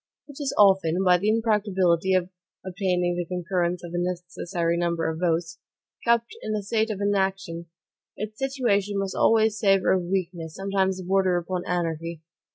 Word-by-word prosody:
It 285 -2 -12
is 280 -2 -1
often, 190 -3 +4
by 180 -1 +5
the 205 +4 0
impracticability 195 -5 +2
of 180 -1 +1 0.4
obtaining 180 -2 0
the 175 - -2
concurrence 180 0 -2
of 170 - -7
the 175 - -2
necessary 175 -1 -2
number 170 -1 0
of 160 0 -3
votes, 170 -1 -1 0.4
kept 235 - +1
in 215 - -2
a 210 - -3
state 220 +2 0
of 210 -3 -3
inaction. 190 -4 -1 0.5
Its 215 +1 -6
situation 230 -7 0
must 195 -1 -2
always 220 -1 +3
savor 195 -3 +3
of 185 -2 +1
weakness, 175 -3 -3
sometimes 190 -1 -1
border 185 -1 +2
upon 180 +1 -3
anarchy. 165 -2 -3
185 Hz, 160 wpm, -25 LUFS, 175-205 Hz, 0.5 s, by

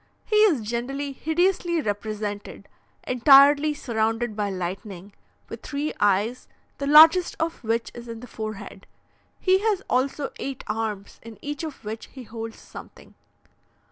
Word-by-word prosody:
He 425 - +1
is 405 - +4
generally 250 +6 -3
hideously 340 +4 0
represented, 205 -3 -4 0.4
entirely 280 +4 +6
surrounded 225 -3 -1
by 205 -1 -1
lightning, 190 +1 -6 0.3
with - - -9
three 290 +2 -3
eyes, 205 +5 +1 0.3
the 280 - -2
largest 320 +4 +7
of 325 -3 -3
which 230 +1 -1
is 240 0 -10
in 230 -1 -7
the 250 - -10
forehead; 215 -4 -8 0.5
he 375 0 +3
has 410 -2 0
also 270 +3 -1
eight 275 -2 -5
arms, 210 -2 -4
in 230 -1 -12
each 290 +1 -5
of 300 -8 -8
which 220 +1 -6
he 260 - -9
holds 225 -1 -7
something. - - -13
240 Hz, 140 wpm, -24 LUFS, 215-295 Hz, 0.5 s, largest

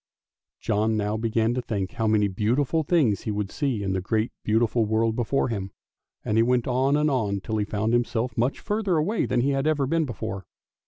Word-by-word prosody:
John 110 0 0
now 105 0 -1
began 115 +1 0
to 125 - -1
think 100 -6 -3
how 115 -1 -1
many 105 -1 +3
beautiful 125 - 0
things 145 - +2
he 110 - -3
would 105 -1 -3
see 130 -9 -1
in 95 -1 -1
the 95 - -1
great 110 +4 -1
beautiful 115 +1 +2
world 110 +1 +1
before 125 +3 0
him, 100 -4 -3 0.6
and 105 - 0
he - - +6
went 120 0 +2
on 130 +3 +2
and 150 0 +2
on 105 -7 0
till 110 +3 -3
he 105 - 0
found 110 +2 -1
himself 120 0 0
much 125 +3 0
further 205 -5 0
away 200 +9 0
than 125 -1 +1
he 140 +3 +1
had 135 +2 0
ever 150 -3 +2
been 165 +3 +1
before. 110 -6 -5
115 Hz, 210 wpm, -25 LUFS, 105-135 Hz, 0.6 s, he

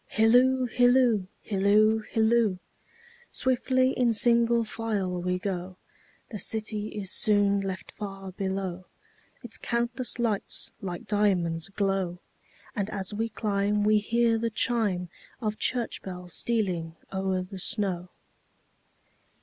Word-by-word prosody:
Hilloo, 250 +4 +4
hilloo, 245 -4 +3 0.2
hilloo, 210 +2 +3
hilloo! 220 -3 +3 0.7
Swiftly 260 0 +2
in 245 -3 +2
single 235 +1 +4
file 210 -5 -2
we 180 +1 0
go, 185 -1 -4 0.5
The 210 - -6
city 215 -1 -1
is 200 -3 -4
soon 205 -2 +4
left 190 -1 -5
far 195 -2 -7
below, 190 -1 -3 0.6
Its 240 - -7
countless 240 +1 -1
lights 225 -4 -1
like 180 -3 -5
diamonds 185 -5 +1
glow; 195 -3 -1 0.6
And 205 -2 -2
as 200 -1 -3
we 225 +2 -1
climb 205 -1 0
we 215 0 +4
hear 230 +2 +2
the 230 0 0
chimeOf 215 -1 -2
church 245 -2 -1
bells 180 -2 -6
stealing 180 -8 0 0.2
o'er 190 -1 -1
the 190 +1 -9
snow. 185 -3 -1
210 Hz, 115 wpm, -27 LUFS, 190-230 Hz, 0.7 s, Hilloo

